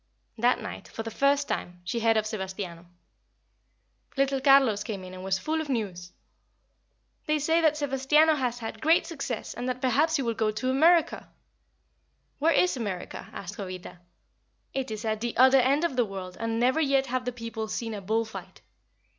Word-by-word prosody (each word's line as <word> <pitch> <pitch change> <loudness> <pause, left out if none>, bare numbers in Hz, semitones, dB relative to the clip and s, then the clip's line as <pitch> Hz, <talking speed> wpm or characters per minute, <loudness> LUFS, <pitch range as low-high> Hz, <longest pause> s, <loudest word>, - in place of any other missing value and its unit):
That 245 +2 +2
night, - - -7
for 225 - -6
the 225 - -6
first 280 +4 +2
time, 175 0 -4
she 180 +7 -2
heard 225 -1 +3
of 215 - +1
Sebastiano. 190 -5 -5 1.3
Little 275 0 +1
Carlos 270 -6 +5
came 200 -4 -5
in 185 0 -9
and 185 0 -8
was 190 0 0
full 315 +10 -2
of 305 - -7
news. 185 -8 -3 1.2
"They 305 0 +2
say 320 +3 +2
that 310 -2 +3
Sebastiano 290 +2 +3
has 250 -5 -1
had 225 -2 -7
great 325 +5 +4
success, 275 -8 -5
and 250 +1 -4
that 250 0 -3
perhaps 285 +6 +2
he 275 - 0
will 230 -1 0
go 220 -1 0
to 240 +5 -1
America." 325 +4 +3 1.1
"Where 320 +3 +3
is 360 0 +3
America?" 200 -7 -5
asked 200 +1 -8
Jovita. 185 -2 -7 0.7
"It 265 -2 -2
is 215 +1 -5
at 220 -1 -1
the 240 -1 -3
other 260 +2 +7
end 275 +5 +2
of 335 -6 0
the 245 -2 +2
world, 190 -3 -7
and 230 0 -1
never 255 +6 +3
yet 275 -2 +2
have 255 0 -2
the 250 - -1
people 230 -2 -5
seen 225 +1 -4
a 205 - -5
bull 220 +4 0
fight." 220 - -10
240 Hz, 185 wpm, -27 LUFS, 215-275 Hz, 1.3 s, other